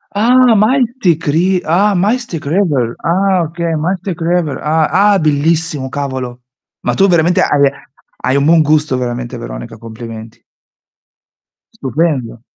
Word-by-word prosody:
Ah! 245 +2 +4
Mystic 220 - +1
Ri 180 +5 +1
Ah, 195 +6 +2
Mystic 200 - -1
River! 145 - 0
Ah, 185 +3 +1
oka 165 +1 -3
Mystic 180 +2 -3
River! 165 -3 0
Ah. 155 0 +1
Ah, 205 +2 +3
è - - +2
bellissimo, 155 -2 0
cavolo! 130 -3 -5 0.4
Ma - - +1
tu, 195 - +3
veramente 175 -1 +2
hai 140 -1 +3 0.5
hai 130 - 0
un 140 0 +2
buon 165 0 +5
gusto 150 -3 +1
veramente 125 0 -4
Veronica, 115 -1 -8
complimenti. 115 0 -10 1.3
Stupendo. 135 -5 -2
160 Hz, 130 wpm, -14 LUFS, 130-185 Hz, 1.3 s, buon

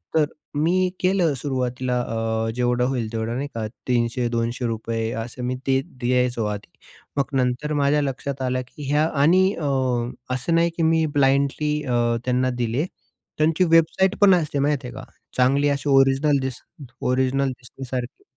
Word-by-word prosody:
तर 155 -2 +5 0.4
मी 185 +3 +2
केलं 185 -4 +2
सुरुवातीला 125 -2 -1
अ, 115 -1 -2
जेवढं 125 0 +1
होईल 120 -5 -2
तेवढं, 115 +1 -2
नाही 140 +3 -2
का? 110 -1 -2 0.2
₹300-200 115 -2 -1
असं 120 +2 -8
मी 125 +1 -1
ते 135 0 +3
द्यायचो 125 -2 0
आधी. 105 0 -5 0.5
मग 140 0 -1
नंतर 130 +4 0
माझ्या 145 +1 +3
लक्षात 135 0 -3
आलं 130 0 0
की 145 +3 -11
ह्या 150 +1 +3 0.2
आणि 175 +6 +5
अ, 160 - -4 0.7
असं 165 +6 0
नाही 170 0 +3
की 165 - +1
मी 160 0 +3
ब्लाइंडली 140 +2 +2
अ, 125 -4 -1 0.3
त्यांना 130 0 +1
दिले. 120 +7 0 0.5
त्यांची 160 +3 +3
वेबसाईट 170 +4 +3
पण 200 -2 +7
असते 150 -4 -1
माहीत 145 +1 +2
आहे 125 - -7
का? 135 - -8 0.3
चांगली 135 +3 +3
अशी 140 +1 -1
ओरिजिनल 135 +1 +4
दिस 130 -1 -4 0.4
ओरिजिनल 130 +2 +1
दिसण्यासारखी. 125 0 -7
130 Hz, 150 wpm, -23 LUFS, 125-150 Hz, 0.7 s, पण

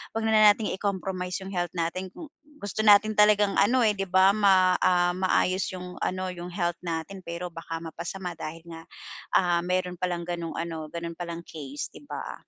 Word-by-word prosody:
'wag 225 - -1
na - - +2 0.2
natin 210 +1 -2
i-compromise 190 -1 -3
yung 195 - -7
health 175 -2 -2
natin 170 +3 -2
kung 310 -3 -10 0.3
gusto 205 +2 -2
natin 210 +1 +6
talagang 210 -1 +5
ano, 240 +4 +4
eh, 215 - +4
'di 195 0 -2
ba 190 +2 +5
ma, 190 -3 +4
ah, 175 -1 +3
maayos 185 0 +1
yung 180 0 -8
ano, 185 0 -2
yung 175 0 -7
health 175 -2 -1
natin. 165 +3 -4
Pero 170 +1 -5
baka 165 0 -6
mapasama 175 +3 -6
dahil 165 +1 -7
nga, 165 -1 -9 0.5
ah, 175 -2 +3
mayro'n 180 -1 -1
palang 175 -2 -2
gano'ng 170 -2 -4
ano, 165 -2 -4
gano'n 170 +1 -6
palang 170 -1 -5
case, 145 -4 -7
'di 285 - -15
ba? - - -6
180 Hz, 185 wpm, -27 LUFS, 170-195 Hz, 0.5 s, natin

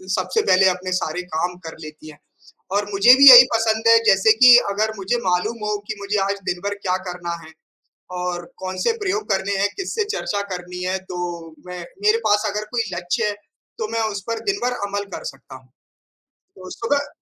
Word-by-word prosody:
सबसे 445 - -1
पहले 190 - +3
अपने 185 0 -4
सारे 180 -2 -2
काम 175 +3 -1
कर 160 - -8
लेती 155 0 -11
हैं, 150 - -15 0.5
और 205 +1 0
मुझे 200 +5 +6
भी 275 0 +9
यही 245 0 +12
पसंद 225 0 0
है 230 - +7
जैसे 195 +3 +5
कि 245 -1 +10 0.2
अगर 215 +2 -1
मुझे 195 +5 -1
मालूम 185 +6 0
हो 210 0 -1
कि - - -4
मुझे 200 +1 -2
आज 200 0 -3
दिन-भर 195 +3 -3
क्या 185 -2 -2
करना 175 -1 -5
है, 160 - -14 0.7
और 175 -1 -4
कौन-से 185 0 -2
प्रयोग 415 +1 -3
करने 195 +1 -1
हैं। 200 +1 +2
किससे 405 +3 -2
चर्चा 205 -1 -3
करनी 180 0 -8
है, 185 +1 -1
तो 175 -3 -7
मैं 180 0 -7 0.2
मेरे 425 +2 +4
पास 210 +1 +2
अगर 210 +1 -4
कोई 240 -2 0
लक्ष्य 175 +3 -2
है, 210 - -2 0.4
तो 220 - -3
मैं 230 0 -1
उस 200 -1 -5
पर 230 0 -3
दिन 400 - 0
भर 250 - 0
अमल 200 0 -4
कर - - -8
सकता 135 0 -15
हूँ। 130 -1 -15 0.9
तो 185 -1 -11
सुबह 285 +5 -2
200 Hz, 195 wpm, -21 LUFS, 180-225 Hz, 0.9 s, यही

